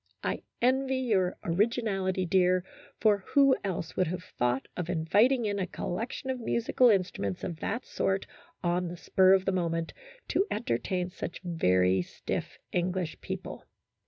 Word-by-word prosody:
I - - -1 0.2
envy 265 +1 +3
your 200 -8 +1
originality, 195 -1 0
dear, 180 0 +3 0.4
for 210 -2 +4 0.2
who 275 -2 +7
else 180 -4 -3
would 185 - +2
have 180 +2 -4
thought 125 -3 -1
of 180 -1 -4
inviting 205 +10 +3
in 205 -1 -1
a 185 - -1
collection 230 +10 -4
of 260 - -4
musical 235 +2 +3
instruments 180 - 0
of 165 -3 -4
that 230 +4 -3
sort 195 0 -1 0.4
on 175 +1 +1
the 175 +1 -6
spur 190 +2 +4
of 190 -1 +3
the - - +2
moment, 165 -2 -1 0.4
to 395 - +2
entertain 180 - -1
such 175 - -6
very 95 - +2
stiff - - -5
English 180 -1 -1
people." - - -6
185 Hz, 150 wpm, -29 LUFS, 170-220 Hz, 0.4 s, who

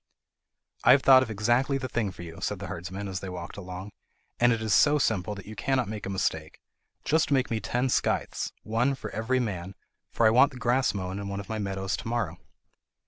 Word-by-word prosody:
"I 125 - +8
have 135 - +3
thought 130 -1 +8
of 130 - -2
exactly 120 +6 +1
the 130 -1 -4
thing 115 -4 -1
for 90 - -9
you," 80 -1 -9
said - - -2
the - - -7
herdsman 95 +4 -6
as 95 -1 -4
they 95 - -6
walked 90 -1 -7
along, 95 +1 -7 0.5
"and 120 0 +5
it 115 - +1
is 110 -2 0
so 145 +9 +5
simple 105 -6 0
that 100 - -10
you 110 - -9
cannot 130 +4 0
make 105 -2 -5
a - - -4
mistake. 80 -5 -2 0.5
Just 160 +1 +2
make 135 -4 +1
me 115 - 0
ten 125 +4 -1
scythes, 125 - 0
one 120 +5 +1
for - - -7
every 115 +5 0
man, 95 -5 -4 0.3
for 115 - +1
I 110 - +6
want 130 +4 +5
the - - -9
grass 125 +1 +1
mown 95 0 -4
in 100 - -5
one 100 0 -4
of 100 - -8
my 110 -1 -2
meadows 95 -1 -2
to - - -7
morrow." 120 0 -2
110 Hz, 225 wpm, -27 LUFS, 95-125 Hz, 0.5 s, I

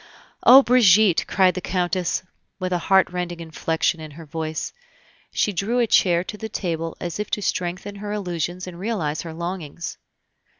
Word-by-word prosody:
"Oh, 265 +2 +9
Brigitte!..." 215 -7 +5
cried 185 -1 +3
the 185 - -4
Countess, 180 -1 -1 0.3
with 185 -1 -2
a 175 - +1
heart 190 +2 +3
rending 175 -1 -4
inflection 160 0 -1
in 155 -1 -8
her 165 - -9
voice. 155 +1 -4 0.6
She 210 - 0
drew 205 +7 -1
a 240 - +4
chair 175 -5 +3
to 210 - -7
the 220 - -5
table 165 -5 -3
as 175 +2 -5
if 210 - -3
to 210 - -1
strengthen 185 +3 -3
her 205 +1 -5
illusions 180 -3 -3
and 175 -2 -9
realize 180 -8 -2
her 165 -2 -7
longings. 170 -2 -5
180 Hz, 170 wpm, -23 LUFS, 170-200 Hz, 0.6 s, Oh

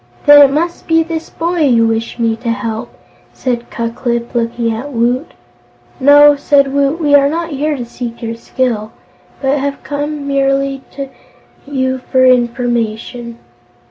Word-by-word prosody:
"Then 290 0 +9
it 275 -1 +6
must 335 +4 -2
be 325 0 +3
this 325 0 -5
boy 340 +1 -2
you 245 -7 +3
wish 225 +1 -2
me 230 -2 +1
to 235 0 -5
help," 230 0 -3 0.4
said 240 -2 -3
Ku 230 -1 -3
Klip, 235 0 -3
looking 235 -1 -1
at 255 +6 -6
Woot. 245 +4 -1 0.7
"No," 290 +2 +7
said 280 -1 +2
Woot, 280 +3 +1
"we 295 -3 +1
are 280 -1 +5
not 335 +2 -3
here 295 +1 -1
to 245 - -5
seek 235 0 -7
your 230 0 -3
skill, 230 -2 -2 0.5
but 275 +2 +1
have 280 0 -2 0.3
merely 275 -2 -1
come - - -24 0.7
to - - -13
you 260 -1 -1
for 255 0 +1
information." 240 -1 0
260 Hz, 155 wpm, -15 LUFS, 235-285 Hz, 0.7 s, Then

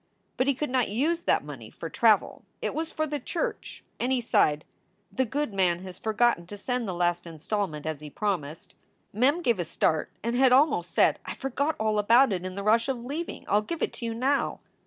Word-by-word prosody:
But 255 - 0
he 280 - +3
could 295 0 -3
not 255 -2 +1
use 305 +11 0
that - - +1
money - - -9
for - - -7
travel; - - +2 0.2
it - - -2
was 320 +1 -3
for 310 - -1
the 295 -1 -3
church, 340 - -4 0.2
and 250 +2 0
he 260 - +2
sighed, 205 -10 +2 0.5
"The 260 +7 0
good 275 -1 -2
man 180 -2 +1
has 185 -1 -9
forgotten 220 -5 +1
to 205 - -8
send 245 +2 -2
the 185 - -2
last 175 0 0
installment 165 -1 -3
as 155 -2 -3
he 150 0 -9
promised." 165 -5 -3 0.4
Mem 280 - +2
gave 235 - +2
a - - +1
start 155 -1 0
and 235 +1 -1
had 260 0 +5
almost 255 - +4
said: - - +3
"I - - -6
forgot 280 +4 -1
all 215 -1 +1
about 230 +3 +5
it 180 -1 -3
in 185 0 -5
the 200 - -4
rush 230 +4 +3
of 245 -3 -3
leaving. 310 +6 -5
I 205 - +3
ll - - +3
give 330 +10 -4
it - - -1
to 235 - -6
you 225 - -3
now." 270 +4 0
225 Hz, 220 wpm, -27 LUFS, 185-265 Hz, 0.5 s, had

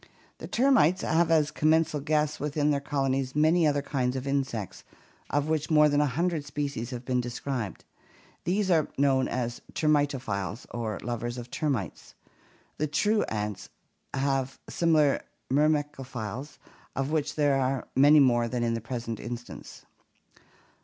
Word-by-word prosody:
The - - -7
termites 235 - +3
have 165 +1 +2
as 155 -2 +3
commensal 155 0 +2
guests 150 +1 0
within 150 0 0
their 140 - +1
colonies 135 -2 -1
many 155 +2 +4
other 145 -1 +1
kinds 130 -3 -1
of 130 0 -4
insects 135 -8 -2 0.5
of 145 0 0
which 155 0 -1
more 150 -1 +6
than 145 0 +2
a 150 - +3
hundred 165 +3 -1
species 145 -5 -4
have 125 -1 -6
been 125 -1 +1
described. 120 -3 -4 0.6
These 190 +2 +1
are 160 -4 +3
known 135 -1 +3
as 120 -1 -3
termitophlles 135 - 0
or 110 -3 -3
lovers 120 +1 -3
of 120 0 -8
termites. 135 - -3 0.6
The 155 - +1
true 210 +8 +2
ants 105 -2 -4 0.4
have 135 -1 -1
similar 155 -4 +2 0.3
myrmecophiles, 140 -4 -1 0.4
of 135 +2 -1
which 150 -2 -1
there 145 -2 +2
are 130 0 -1
many 145 +3 +7
more 120 -4 +4
than 120 0 -2
in 115 -1 +1
the 115 - -2
present 115 -1 -5
instance. 120 0 -8
140 Hz, 145 wpm, -28 LUFS, 125-150 Hz, 0.6 s, many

